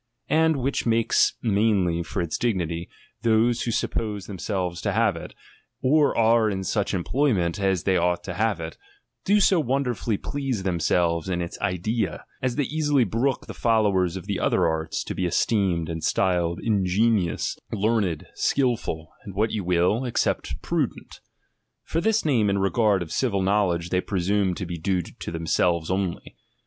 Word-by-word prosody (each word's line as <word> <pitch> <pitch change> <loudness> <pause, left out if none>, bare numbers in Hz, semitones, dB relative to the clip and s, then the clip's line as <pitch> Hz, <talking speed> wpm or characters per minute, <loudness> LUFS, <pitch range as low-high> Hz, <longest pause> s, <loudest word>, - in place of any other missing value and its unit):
And, 160 +1 +4
which 135 -1 -1
makes 115 0 +3
mainly 100 -6 +2
for 85 - -3
its 85 - -3
dignity, 85 -7 -1 0.3
those 115 +1 +2
who - - -2
suppose 105 -3 -2
themselves 90 -2 -3
to 100 - -1
have 110 -3 +2
it, 80 - -9 0.5
or 145 +2 +3
are 115 -1 +4
in 95 -2 -3
such 100 +1 -1
employment 95 - 0
as 95 -3 +1
they 95 -1 +2
ouglit 90 0 +1
to 90 - -5
have 110 +3 0
it, - - -7 0.5
do 205 +2 +4
so 190 -3 +4
wonderfidly 125 -5 -1
please 135 -7 -3
tliemselves 85 -1 +1
in 90 -1 -1
its 85 -1 -5
idea, 105 +1 -1 0.2
as 125 -2 -1
they 145 - +1
easily 145 -2 +1
brook 120 +6 -1
the - - -8
followers 100 -6 +2
of 95 - -8 0.2
other - - +2
arts 80 0 -2
to - - -5
be 90 - -1
esteemed 90 -3 +1
and 80 -1 -5
styled 90 -2 +1
in 105 -4 +1
genuous, 95 -2 +1 0.2
learned, 100 -6 0
skilful, 115 - -1
and 100 -3 -9
what 110 +2 +1
you 105 -3 -2
wUl, 90 +7 +2
except 120 -2 -1
prudent: - - -3 0.6
for 165 - -2
this 220 0 +1
name, 115 -9 +2
in 100 - +1
regard 100 -1 +2
of 80 - -11
civil 100 -7 0
know 100 +1 +3
ledge, 85 0 -3
they 90 - +2
i)re8ume 95 0 0
to 90 - -4
be 85 -1 -5
due 90 +1 0
to - - -9
themselves 85 +1 0
only. 95 -2 -3
100 Hz, 165 wpm, -25 LUFS, 90-115 Hz, 0.6 s, And